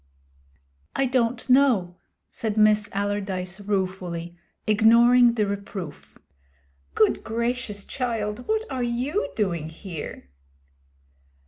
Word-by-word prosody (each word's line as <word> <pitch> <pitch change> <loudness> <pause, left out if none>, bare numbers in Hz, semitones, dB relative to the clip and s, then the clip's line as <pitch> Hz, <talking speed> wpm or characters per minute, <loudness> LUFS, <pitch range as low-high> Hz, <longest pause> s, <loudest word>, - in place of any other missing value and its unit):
'I 270 - +2
don't 250 -2 0
know,' 250 -10 +3 0.4
said 220 -2 -3
Miss 215 -1 +4
Allardyce 195 -2 -2
ruefully, 185 -4 -3 0.3
ignoring 235 +3 +5
the 215 -3 +2
reproof. 200 -5 -6 0.8
'Good 215 - +3
gracious, 235 -2 -3
child, 230 -3 -3
what 440 0 0
are 260 -1 -2
you 245 - -1
doing 170 -7 -1
here?' 160 - -8
210 Hz, 95 wpm, -25 LUFS, 190-240 Hz, 0.8 s, ignoring